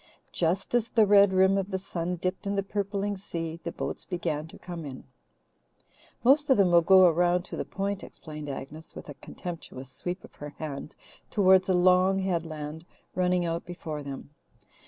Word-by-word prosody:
Just 180 +5 -1
as 235 -2 +2
the 225 -3 +4
red 200 -1 +6
rim 190 +1 +4
of 195 0 -3
the 190 - -1
sun 180 -2 -3
dipped 185 +3 -3
in 200 - 0
the 195 - 0
purpling 200 0 -2
sea, 165 -4 -5
the 170 - -3
boats - - -5
began 160 -4 -3
to - - -13
come 175 -2 -7
in. 135 -3 -8 1.2
"Most 285 +4 +4
of 265 - +5
them 190 -3 +4
will 170 0 +7
go 185 +2 +7
around 175 +1 +3
to - - -7
the - - -3
Point," 200 0 -3
explained 150 -2 -9
Agnes, 150 +4 -8
with - - -9
a - - -6
contemptuous 135 -7 -7
sweep 180 +6 -5
of - - -14
her 145 0 -9
hand 150 -1 -6 0.3
towards 190 -2 +4
a 185 - +4
long 185 +2 +4
headland 160 -4 -3 0.3
running 180 -1 +1
out 165 0 -2
before 160 -4 -6
them. 140 0 -8
180 Hz, 180 wpm, -28 LUFS, 160-195 Hz, 1.2 s, will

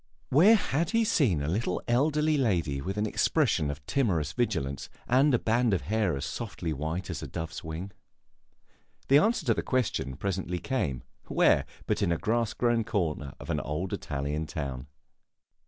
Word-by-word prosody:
Where 185 - +7
had 165 -5 0
he 230 0 +2
seen 125 - +2
a - - -2
little 90 +3 -1
elderly 150 +5 +2
lady 85 - 0
with 95 +6 -4
an 105 - +1
expression 110 - +1
of 70 0 -6
timorous 85 - 0
vigilance, 80 - -2 0.2
and 135 +4 +4
a 125 - +4
band 115 -1 +2
of - - -2
hair 105 -7 0
as 70 - -4
softly 85 -1 -4
white 80 +6 -3
as - - -5
a - - -5
dove's 80 -1 -6
wing? 80 +5 -6 1.2
The 140 +2 +7
answer 225 +9 +1
to - - +4
the - - -2
question 125 - -1
presently 95 -1 -2
came 75 - -2 0.2
Where - - +3 0.2
but - - 0
in - - +2
a 85 - +1
grass 115 +2 0
grown 120 -2 +2
corner 75 -10 -2
of - - -5
an - - 0
old 80 +6 -3
Italian 75 +2 -3
town? 70 -5 -5
95 Hz, 170 wpm, -28 LUFS, 75-125 Hz, 1.2 s, Where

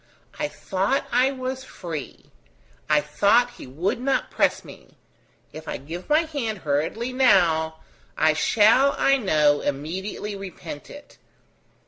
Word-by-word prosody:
I 300 - 0
thought 205 +2 -1
I 250 +2 +4
was 260 -1 -5
free; 165 - -8 0.6
I 150 -1 +4
thought 205 +11 +3
he - - -9
would 170 - -2
not 270 +1 0
press - - +1
me. - - -14 0.6
If 155 - -10
I - - -3
give 165 +7 -8
my 305 +2 +5
hand 275 -9 -3
hurriedly 160 - -1
now, 170 -11 +3 0.4
I 155 0 +4
shall, 225 - +4
I 275 0 +4
know, 150 - +2
immediately 185 +8 -4
repent 180 -6 -8
it. 290 0 -13
195 Hz, 130 wpm, -24 LUFS, 155-255 Hz, 0.6 s, my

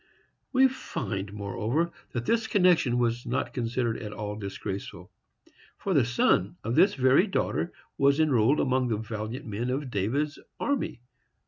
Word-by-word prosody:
We 265 0 +6
find, 100 - -4
moreover, 105 - -1 0.2
that 120 -1 -2
this 230 - +1
connection 180 -10 +3
was 120 0 0
not 125 +1 -2
considered 120 -1 -1
at 105 - -6
all 105 0 -5
disgraceful, 100 -1 -6 0.7
for 195 - -2
the 140 -7 +4
son 100 -6 +2
of 115 - -2
this 195 +9 +5
very 130 +8 +4
daughter 175 -2 -1 0.3
was 140 +2 +4
enrolled 140 -3 +3
among 130 -1 +2
the 110 -3 0
valiant 110 +2 -5
men 110 +3 -3
of 130 0 -2
David's 140 +10 -1 0.2
army. 165 - -1
125 Hz, 145 wpm, -28 LUFS, 110-150 Hz, 0.7 s, We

